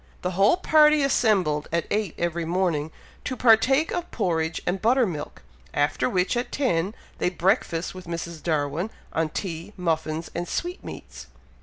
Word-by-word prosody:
The 180 - 0
whole 195 - +4
party 305 -4 +5
assembled 195 - +2
at 170 0 0
eight 210 -5 -1
every 170 0 -1
morning, 165 -3 0 0.3
to 255 - -3
partake 255 +7 +4
of 350 -1 -3
porridge 165 -6 -1
and 185 +2 -1
butter 245 +3 +4
milk, 150 - -6 0.3
after 145 -3 +1
which, 180 +2 +1
at 240 +1 -2
ten, 200 -8 0 0.2
they - - +2
breakfasted 180 -2 0
with 185 -2 -10
Mrs. 170 -1 -5
Darwin 155 +4 -1 0.2
on 160 -1 0
tea, 170 +2 -5
muffins, 160 -2 -2
and 175 +1 -3
sweetmeats. 355 +2 -6
180 Hz, 150 wpm, -25 LUFS, 160-225 Hz, 0.3 s, party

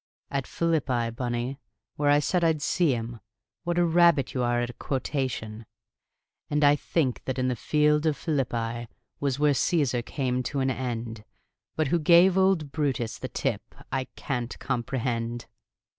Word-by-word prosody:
"At 135 -2 -2
Philippi, 130 -8 0
Bunny, 120 +2 -3 0.4
where 145 -1 +1
I 145 - +6
said 170 +4 +1
I'd 160 -3 +2
see 165 -6 +2
him. 115 0 -5 0.5
What 175 0 -1
a 175 - +4
rabbit 170 -5 +4
you 130 - -1
are 120 0 +1
at 120 0 -2
a - - -18
quotation! 125 -5 -3 0.9
"'And 150 0 +1
I 145 0 +6
think 145 -3 -1
that 130 - -2
the 130 -1 0
field 150 +5 +2
of 150 - +1
Philippi 120 -6 -2 0.3
Was 140 -2 0
where 150 0 +3
Caesar 135 -4 +1
came 125 0 -2
to 135 +3 -3
an 130 0 +1
end; 115 -3 -4 0.5
But 155 -3 0
who 170 - +2
gave 170 +4 +6
old 190 -6 +2
Brutus 135 -7 -1
the - - -5
tip, - - -3 0.2
I 130 -1 -1
Can't 125 -4 -3
comprehend!' 120 -2 -2
135 Hz, 160 wpm, -27 LUFS, 120-150 Hz, 0.9 s, I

